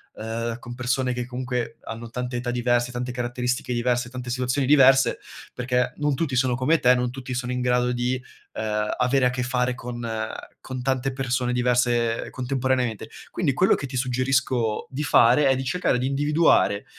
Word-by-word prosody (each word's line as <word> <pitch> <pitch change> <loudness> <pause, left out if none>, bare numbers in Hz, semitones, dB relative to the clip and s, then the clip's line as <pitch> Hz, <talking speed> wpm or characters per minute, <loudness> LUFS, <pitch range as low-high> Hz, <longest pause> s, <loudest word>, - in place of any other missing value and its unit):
uhm, 115 +1 -4
con 120 0 -8
persone 130 +1 0
che 125 0 -3
comunque 125 -1 -4
hanno 115 +1 -7
tante 125 +1 -4
età 120 0 -3
diverse, 120 0 +1
tante 125 +1 -4
caratteristiche 125 +1 -2
diverse, 120 0 0
tante 125 0 -7
situazioni 125 +2 0
diverse, 135 -3 +5 0.3
perché 125 0 0
non 150 -1 0
tutti 135 -2 -1
sono 125 -1 +2
come 130 +6 +2
te, 125 0 +5
non 125 0 -1
tutti 130 0 -6
sono 125 0 -3
in 125 0 -2
grado 125 0 +2
di, 125 +1 -1 0.3
uhm, 105 -1 -1
avere 125 +1 +2
a - - +4
che 125 0 -2
fare 125 0 0
con 120 -1 -6 0.6
con 130 -1 -5
tante 135 0 0
persone 125 -2 -1
diverse 120 -2 +1
contemporaneamente. 130 -3 -1 0.2
Quindi - - 0
quello 180 +8 +4
che - - -5
ti 130 -1 -5
suggerisco 130 -3 0
di 140 +3 -4
fare 135 0 +5
è 135 - +4
di 130 - -3
cercare 135 -1 +1
di 125 - -1
individuare, 145 -7 +2
125 Hz, 175 wpm, -24 LUFS, 120-130 Hz, 0.6 s, diverse